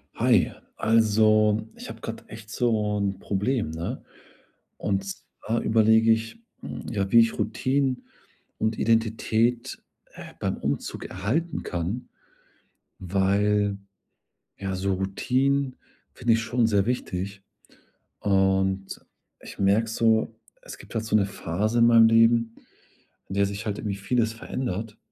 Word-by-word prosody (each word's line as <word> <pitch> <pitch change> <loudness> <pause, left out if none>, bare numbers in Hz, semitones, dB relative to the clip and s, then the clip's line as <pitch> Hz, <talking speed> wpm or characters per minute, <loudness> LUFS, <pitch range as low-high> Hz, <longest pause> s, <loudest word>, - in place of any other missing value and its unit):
Hi, - - +3 0.3
also, 110 -1 +3
ich - - -9
habe 115 0 -9
gerade 115 - -7
echt 110 -1 -11
so 110 -4 0
‘n 100 -1 -1
Problem, 105 - -1
ne, 80 +1 -5 0.8
und 95 -1 -1
zwar 110 +3 -5
überlege 110 0 +4
ich, 115 - -3 0.2
hm, - - -7
ja, 100 -4 -1
wie 115 - +8
ich 115 0 +1
Routinen 130 +3 0 0.5
und 110 0 -1
Identität, 115 +2 +1 0.3
äh, - - -11
beim - - -2
Umzug 70 +1 -3
erhalten 135 - -2
kann, 90 +7 -4 0.9
weil, 100 +2 +1 0.8
ja, 95 -1 -3
so 95 +1 -1
Routinen 130 +8 0 0.4
finde 120 -2 +1
ich 115 - +1
schon 115 0 +1
sehr 100 -3 +2
wichtig. 100 -5 -3 0.8
Und, 95 -1 +1 0.4
ich - - -11
merke 100 +4 +2
so, 115 0 +2 0.3
es - - -10
gibt - - -14
halt 110 0 -1
so 110 - +2
'ne 105 - +3
Phase 100 +4 -2
in 115 - +6
meinem 115 -1 +7
Leben, 115 0 +4 0.7
in 95 - -6
der 100 0 +3
sich 100 +2 -5
halt 105 -2 -3
irgendwie 100 -2 -3
vieles 115 +3 0
verändert, 115 -2 -5
110 Hz, 130 wpm, -25 LUFS, 100-115 Hz, 0.9 s, wie